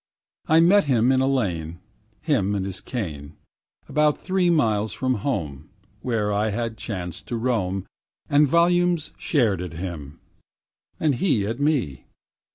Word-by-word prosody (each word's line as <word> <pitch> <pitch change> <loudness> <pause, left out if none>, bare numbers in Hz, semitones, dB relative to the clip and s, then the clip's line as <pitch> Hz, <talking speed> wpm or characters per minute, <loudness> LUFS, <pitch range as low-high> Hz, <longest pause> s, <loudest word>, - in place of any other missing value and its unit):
I 160 +1 +5
met 195 +3 +5
him 125 -2 +3
in 130 0 +3
a 130 - +2
lane, 85 -11 -1 0.5
Him 105 - +1
and 95 -1 -2
his 95 -1 -4
cane, 80 - -6 0.5
About 150 -1 +2
three 185 -2 0
miles 110 -10 +1
from 130 -1 0
home, 75 - -3 0.3
Where 110 -4 -1
I 105 +2 +1
had 115 +1 -3
chanced 90 -6 -6
to 120 - -3
roam, 100 -6 -1 0.4
And 145 +1 +4
volumes 175 +1 +2
stared 110 - +1
at 90 -3 -6
him, 80 -5 -7 0.8
and 150 -3 +2
he 120 - +1
at 115 +5 -3
me. 145 - 0
115 Hz, 145 wpm, -24 LUFS, 95-145 Hz, 0.8 s, I